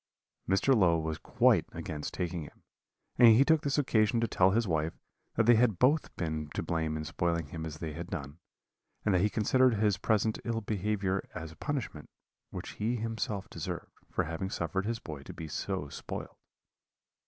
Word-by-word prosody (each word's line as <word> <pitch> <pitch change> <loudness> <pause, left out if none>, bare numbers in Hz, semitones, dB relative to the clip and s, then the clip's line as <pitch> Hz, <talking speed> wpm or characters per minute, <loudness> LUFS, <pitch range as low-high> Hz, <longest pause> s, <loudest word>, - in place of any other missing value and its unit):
Mr. 100 +8 +4
Low 90 -6 +4
was 80 -1 -3
quite - - +3
against 75 -1 -5
taking 90 -2 -3
him, 75 - -12 0.6
and 120 - +9
he 135 +5 +6
took 160 -1 +4
this 140 -1 0
occasion 115 -5 +3
to 115 - +2
tell 95 -2 +4
his 110 +3 +1
wife 80 -1 0 0.4
that 115 - +3
they 120 - +7
had 110 -4 +3
both 140 - +2
been 80 -3 -3
to - - -1
blame 80 -2 -1
in 75 - -4
spoiling 85 -1 -1
him 80 0 -5
as 80 -1 -7
they 80 -1 -5
had - - -6
done, 70 +3 -6 0.7
and 105 - +3
that 90 - +3
he 105 - +3
considered 125 +3 +3
his 105 -3 +2
present 110 0 +1
ill 115 -1 -1
behaviour 100 -2 -1
as 80 -2 -6
a - - -14
punishment 125 - -4 0.4
which - - -6
he 115 +3 +1
himself 110 -3 -3
deserved, - - -5 0.2
for - - +1
having 85 +4 -4
suffered 95 +3 -2
his 115 0 -1
boy 75 -9 -8
to - - -9
be 80 - -6
so 90 +1 -3
spoiled. - - -7
95 Hz, 190 wpm, -31 LUFS, 80-115 Hz, 0.7 s, and